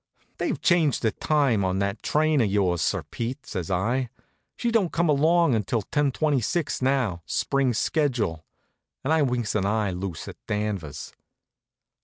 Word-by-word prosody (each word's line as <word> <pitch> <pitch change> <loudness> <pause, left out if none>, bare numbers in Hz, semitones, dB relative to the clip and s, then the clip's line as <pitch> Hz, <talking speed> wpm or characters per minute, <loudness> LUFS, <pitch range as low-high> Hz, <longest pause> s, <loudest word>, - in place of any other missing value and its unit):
"They've - - -1
changed 165 -8 +2
the 110 - +3
time 140 -9 +1
on 95 0 0
that 100 +2 -1
train 155 -2 +2
of 110 - +2
yours, 95 -4 +1
Sir - - 0
Pete," 125 +4 -5
says 90 -3 -5
I. 115 +8 0 0.5
"She 235 - -1
don't 210 -7 +2
come 170 0 +1
along 160 +1 +4
until 110 0 0
ten 145 +4 0
twenty 145 -1 +1
six 155 +8 -1
now, 130 -10 +1
spring 140 -2 +1
schedule," 120 - 0 0.6
and 150 - +1
I 160 - +3
winks 125 -5 0
an 100 -2 +1
eye 105 -1 0
loose 90 -2 -5
at - - -8
Danvers. 100 -9 -3
120 Hz, 160 wpm, -25 LUFS, 100-150 Hz, 0.6 s, along